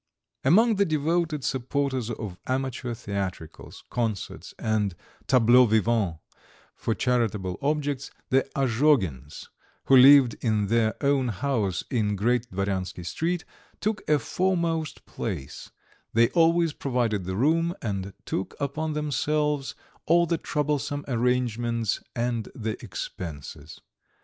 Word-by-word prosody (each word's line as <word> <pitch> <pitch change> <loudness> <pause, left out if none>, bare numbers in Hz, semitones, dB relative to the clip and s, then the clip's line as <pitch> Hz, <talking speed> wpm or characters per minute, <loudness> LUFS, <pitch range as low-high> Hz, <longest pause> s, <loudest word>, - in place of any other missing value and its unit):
II - - -1
Among 220 +7 +5
the 200 - +4
devoted 155 -1 0
supporters 130 -2 -1
of 105 -6 -6
amateur 130 -2 -2
theatricals, 100 -7 -6
concerts 115 -5 -3
and 105 -4 0 0.3
tableaux 125 0 +6
vivants 110 -5 +1 0.6
for 115 - -2
charitable 110 -7 0
objects 145 -2 -1 0.2
the 135 0 +2
Azhogins, 115 - +1 0.4
who 135 - +5
lived 130 -2 +8
in 105 -4 +1
their 115 -1 +2
own 140 -2 +2
house 110 -4 -1
in 105 -4 +1
Great 120 +4 0
Dvoryansky 95 -2 -3
Street, 165 - -2 0.3
took 210 -1 -1
a 150 - +5
foremost 165 +1 -1
place; 85 - -6 0.4
they 115 +1 +4
always 165 -1 +3
provided 120 -9 -1
the 95 +1 -3
room, 165 - +2
and 100 -3 -4
took 95 - -3
upon 150 +2 -2
themselves 150 -1 -1 0.3
all 170 +1 +5
the 170 -1 -1
troublesome 145 -1 -2
arrangements 120 -3 0
and 120 -2 -1
the 110 -2 -4
expenses. 75 -3 -7
125 Hz, 115 wpm, -26 LUFS, 105-150 Hz, 0.6 s, lived